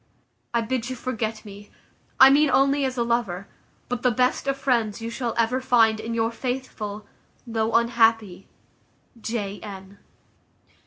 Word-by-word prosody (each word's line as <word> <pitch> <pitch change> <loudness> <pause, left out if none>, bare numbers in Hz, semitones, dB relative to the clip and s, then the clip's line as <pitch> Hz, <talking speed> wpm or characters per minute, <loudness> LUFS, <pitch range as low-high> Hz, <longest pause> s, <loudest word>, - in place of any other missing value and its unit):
I 235 - +1
bid 240 +1 -2
you 255 - -4
forget 225 -3 -4
me, 205 0 -11 0.5
I 265 +1 +9
mean 295 +1 +4
only 275 +1 +3
as 260 -1 -3
a 235 - +2
lover; 235 -6 -1 0.4
but 245 -1 -3
the 250 - +3
best 250 +3 0
of 275 0 0
friends 235 -6 0
you 230 0 -5
shall 235 -1 -3
ever 235 +3 +1
find 225 -4 +3
in 230 +1 -4
your 225 0 0
faithful, 230 -4 -5 0.4
though 225 -1 -1
unhappy, 225 -5 +2 0.7
"J. 205 -3 -4
N." 195 -1 -10
230 Hz, 150 wpm, -24 LUFS, 215-255 Hz, 0.7 s, I